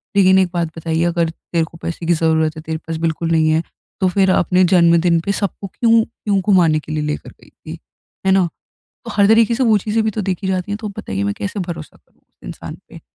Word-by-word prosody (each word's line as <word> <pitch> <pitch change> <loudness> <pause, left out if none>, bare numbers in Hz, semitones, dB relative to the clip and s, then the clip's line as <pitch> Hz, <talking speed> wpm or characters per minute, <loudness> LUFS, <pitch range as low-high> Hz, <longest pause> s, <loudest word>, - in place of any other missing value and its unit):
लेकिन 190 -1 +5
एक 185 -2 +2
बात 170 -2 0
बताइए, 165 +1 -1
"अगर 170 -1 +1
तेरे 165 0 -3
को 165 - -15
पैसे 170 0 -4
की 175 - +4
ज़रूरत 160 -1 +1
है, - - -6
तेरे 160 0 -4
पास 165 -1 -3
बिल्कुल 165 +1 -2
नहीं 160 -1 +3
है, 160 +2 +2 0.4
तो 185 - +3
फिर 190 +1 +2
अपने 180 +1 +3
जन्मदिन 170 -1 +4
पे 200 - 0
सबको 200 0 -3
क्यों 230 +2 +3
क्यों 205 -3 -2
घुमाने 175 -6 +3
के 155 - -10
लिए 155 -1 -1
लेकर 150 0 -4
गई - - -19
थी? - - -11 0.5
है - - +5
ना?" 190 -2 +3 0.6
तो - - -7
हर 200 -1 +4
तरीके 225 +1 +4
से 260 - -1
वो 220 -2 +4
चीज़ें 220 +2 -1
भी 220 - +1
तो - - 0
देखी 190 0 -3
जाती 185 +1 -2
हैं, - - -1
तो 215 -2 -5
अब 200 - -10
बताइए, 95 +1 -3
मैं 100 0 -1
कैसे 200 0 -4
भरोसा 170 -3 -7
करूँ - - -33
उस - - -49
इंसान - - -8
पे? - - -12
175 Hz, 240 wpm, -18 LUFS, 160-200 Hz, 0.6 s, लेकिन